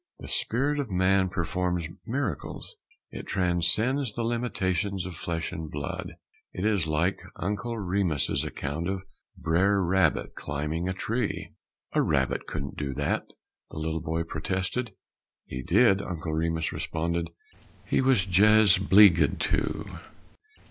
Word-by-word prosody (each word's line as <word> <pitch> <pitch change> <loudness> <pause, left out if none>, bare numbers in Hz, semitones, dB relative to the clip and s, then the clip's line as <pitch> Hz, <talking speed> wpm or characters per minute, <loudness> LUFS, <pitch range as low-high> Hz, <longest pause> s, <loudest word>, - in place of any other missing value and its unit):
The - - -9
spirit 140 +5 0
of 140 -5 -2
man 95 0 +3
performs 90 -1 -1 0.2
miracles; 140 - -3 0.4
it - - -7
transcends 100 +8 +1
the 120 - -1
limitations 100 -5 -1
of 90 -2 -6
flesh 85 +1 -3
and 80 -1 -5
blood. 70 -1 -5 0.4
It 90 - -3
is 100 -7 +2
like 80 +5 +1
Uncle 105 +6 -3
Remus's 90 -6 +1
account 75 +6 -3
of 95 -1 -3 0.3
Brer 95 +5 +2
Rabbit 90 -2 +2
climbing 75 +5 -3
a - - 0
tree. 115 +3 -2 0.4
"A - - +3
rabbit - - 0
couldn't 70 0 -5
do 70 -3 -3
that," - - -1 0.4
the - - -10
little 80 +1 -2
boy 80 +1 -1
protested. 95 +9 -3 0.5
"He 65 - -5
did," 100 - +4
Uncle 85 -4 -4
Remus 80 0 0
responded; 85 +1 -2 0.6
"he - - +2
was 130 -8 +3
jes' 100 +1 +6
'bleeged 95 -2 +6
to." - - 0
90 Hz, 130 wpm, -27 LUFS, 80-105 Hz, 0.6 s, jes